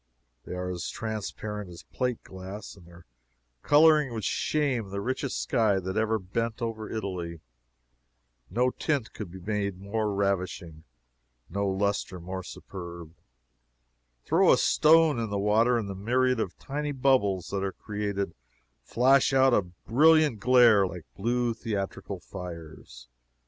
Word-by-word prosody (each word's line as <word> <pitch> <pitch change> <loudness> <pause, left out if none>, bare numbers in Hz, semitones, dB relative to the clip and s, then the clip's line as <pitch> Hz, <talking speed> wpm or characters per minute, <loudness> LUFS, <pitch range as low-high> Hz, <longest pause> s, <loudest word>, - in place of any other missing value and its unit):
They - - -6
are 90 0 -3
as 85 -4 -4
transparent 105 -2 -5
as 85 -1 -11
plate 125 -2 -3
glass, 95 +3 -9
and 90 -4 -17
their 85 0 -16 0.6
coloring 150 - +5
would 110 - -4
shame 130 -8 0
the 100 +1 -4
richest 130 +5 -2
sky 110 -6 +2
that 95 0 -4
ever 110 0 +1
bent 110 +4 -3
over 115 -2 -4
Italy. 90 -6 -4 1.1
No 125 +5 +1
tint 140 -6 -2
could 105 -5 -7
be 100 +3 -2
more 105 +3 -2
ravishing, 90 -5 -2 0.7
no 100 +2 -1
lustre 95 -1 -1
more 95 +2 -5
superb. 85 -3 -9 1.1
Throw - - +4
a - - +5
stone 160 -2 +4
into 115 - -1
the 100 - -2
water, 110 +4 +3
and 110 -3 -3
the 100 - -4
myriad 125 +5 +1
of 95 -5 -3
tiny 145 +1 -4
bubbles 125 -9 +2
that 100 -1 -2
are 95 - -1
created 100 -4 -4 0.5
flash 130 - +3
out 130 -1 +5
a 105 - +4
brilliant 130 - +3
glare 115 -4 +5
like 85 -2 -8
blue 120 +4 0
theatrical 100 -3 -4
fires. 85 -10 -10
105 Hz, 140 wpm, -28 LUFS, 95-120 Hz, 1.1 s, coloring